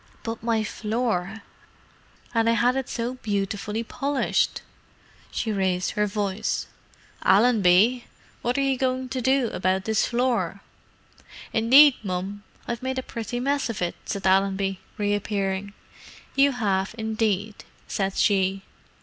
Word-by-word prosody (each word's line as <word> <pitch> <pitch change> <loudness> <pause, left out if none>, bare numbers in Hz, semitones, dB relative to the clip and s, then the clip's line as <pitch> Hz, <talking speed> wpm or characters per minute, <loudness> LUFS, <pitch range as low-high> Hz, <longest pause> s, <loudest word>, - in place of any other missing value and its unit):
"But 225 -1 -4
my 225 -1 +1
floor! 215 -2 -2 0.9
And 230 -1 +3
I - - +4
had 245 +2 +2
it 270 -1 -2
so 235 +2 -2
beautifully 205 +1 -2
polished!" 275 +4 0 0.7
she 225 - -2
raised 185 -3 0
her 210 0 0
voice. 205 0 -2 0.6
"Allenby! 215 +2 +4 0.4
What 245 +3 -1
are 275 - +2
you 265 -2 0
going 255 0 -1
to 255 0 -3
do 260 -1 +2
about 185 +1 0
this 220 -1 +1
floor?" 245 0 0 0.9
"Indeed, 260 +5 +7
mum, 195 0 -4 0.3
I've 235 -2 -3
made 260 0 -3
a 260 - -2
pretty 235 +1 -5
mess 280 +1 0
of 225 - -4
it," 175 -1 -1
said 195 -1 -4
Allenby, 195 0 +2 0.2
reappearing. 200 -1 -1 0.6
"You 275 0 +4
have, 200 -4 -1
indeed," 220 -2 -1 0.2
said 195 -1 -2
she. 195 -1 +2
220 Hz, 130 wpm, -25 LUFS, 195-245 Hz, 0.9 s, Indeed